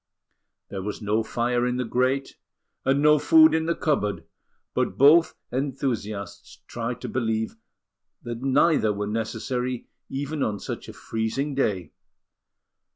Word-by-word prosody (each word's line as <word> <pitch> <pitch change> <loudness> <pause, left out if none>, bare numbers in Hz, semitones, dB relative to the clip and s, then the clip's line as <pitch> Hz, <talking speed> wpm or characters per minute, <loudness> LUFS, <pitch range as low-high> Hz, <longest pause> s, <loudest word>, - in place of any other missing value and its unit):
There 95 - -5
was 105 +2 -4
no 105 0 +1
fire 120 +2 0
in 125 0 -1
the 125 - -1
grate, 130 +3 0 0.5
and 135 +2 +2
no 150 0 +6
food 160 +1 +6
in 160 0 +1
the 170 - +1
cupboard, 140 - 0 0.5
but 95 - -1
both 155 +5 +6 0.2
enthusiasts 120 -7 -3
tried 120 +1 -4
to - - -4
believe 110 - -1 0.7
that 120 0 -5
neither 135 -3 +3
were 105 0 -3
necessary 115 +3 -3 0.2
even 140 +2 -3
on 105 -5 0
such - - -6
a - - -8
freezing 115 +6 -2
day. 100 - -1
125 Hz, 135 wpm, -25 LUFS, 110-140 Hz, 0.7 s, no